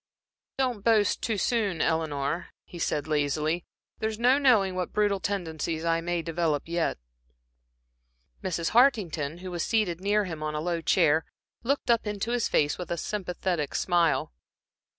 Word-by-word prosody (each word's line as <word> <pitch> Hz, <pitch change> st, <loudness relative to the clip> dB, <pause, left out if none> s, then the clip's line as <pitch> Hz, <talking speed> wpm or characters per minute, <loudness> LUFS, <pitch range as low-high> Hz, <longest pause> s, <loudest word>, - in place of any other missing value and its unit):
"Don't 250 Hz, -6 st, -1 dB
boast 215 Hz, -3 st, +3 dB
too 220 Hz, -2 st, -1 dB
soon, 205 Hz, -5 st, 0 dB
Eleanor," 160 Hz, 0 st, -1 dB, 0.2 s
he 175 Hz, -, -10 dB
said, 150 Hz, -3 st, -1 dB
lazily, 155 Hz, +3 st, 0 dB, 0.4 s
"there's 220 Hz, 0 st, -2 dB
no 250 Hz, +4 st, +4 dB
knowing 220 Hz, -9 st, +4 dB
what 180 Hz, -1 st, -3 dB
brutal 205 Hz, -2 st, +2 dB
tendencies 165 Hz, -4 st, -3 dB
I 165 Hz, 0 st, +2 dB
may 175 Hz, 0 st, -2 dB
develop 165 Hz, -3 st, 0 dB
yet." 170 Hz, 0 st, -1 dB, 1.5 s
Mrs. 170 Hz, -3 st, -1 dB
Hartington, 180 Hz, -, +2 dB
who 185 Hz, -, -5 dB
was 175 Hz, -1 st, -3 dB
seated 195 Hz, -6 st, 0 dB
near 205 Hz, +1 st, +2 dB
him 160 Hz, -4 st, -6 dB
on 155 Hz, 0 st, -3 dB
a -, -, -1 dB
low 170 Hz, +1 st, -1 dB
chair, 160 Hz, -2 st, +3 dB, 0.4 s
looked 270 Hz, 0 st, 0 dB
up 230 Hz, -2 st, +2 dB
into 210 Hz, +2 st, -2 dB
his 240 Hz, -2 st, +1 dB
face 145 Hz, +3 st, +1 dB
with 180 Hz, -, -5 dB
a 170 Hz, -, -1 dB
sympathetic 180 Hz, -5 st, -2 dB
smile. 170 Hz, -, +1 dB
175 Hz, 150 wpm, -27 LUFS, 160-210 Hz, 1.5 s, no